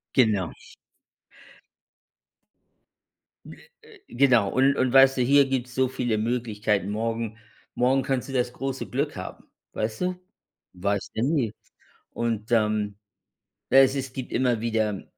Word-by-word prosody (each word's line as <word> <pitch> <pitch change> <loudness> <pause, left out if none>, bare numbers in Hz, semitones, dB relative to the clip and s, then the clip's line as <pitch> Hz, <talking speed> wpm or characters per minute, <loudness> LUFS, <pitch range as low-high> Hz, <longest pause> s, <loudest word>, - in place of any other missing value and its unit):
Genau. 105 -9 +2 2.9
Äh - - -11 0.3
äh, - - -17
genau 120 -5 +3
und 135 +2 +3
und 130 -2 0
weißt 135 0 +6
du, 125 - +2
hier 140 +3 +5
gibt's 130 -2 -3
so 130 0 +2
viele 120 -3 -2
Möglichkeiten. 110 -3 -1
Morgen 115 +1 -3 0.4
morgen 130 +2 +2
kannst 135 0 -2
du - - -6
das 125 -1 0
große 135 0 -4
Glück 145 +4 -2
haben, 95 -1 -8 0.3
weißt 110 0 -3
du? 180 0 0 0.6
Weißt 100 +2 -2
du 110 - -1
nie. 135 -7 0 0.6
Und, 115 -1 -3
ähm 105 -2 +1 0.8
ja 135 - +7
es 135 0 +5
es 135 -2 -4
gibt 130 -2 -6
immer 120 -3 +1
wieder, 110 -3 -1
120 Hz, 135 wpm, -25 LUFS, 110-135 Hz, 2.9 s, ja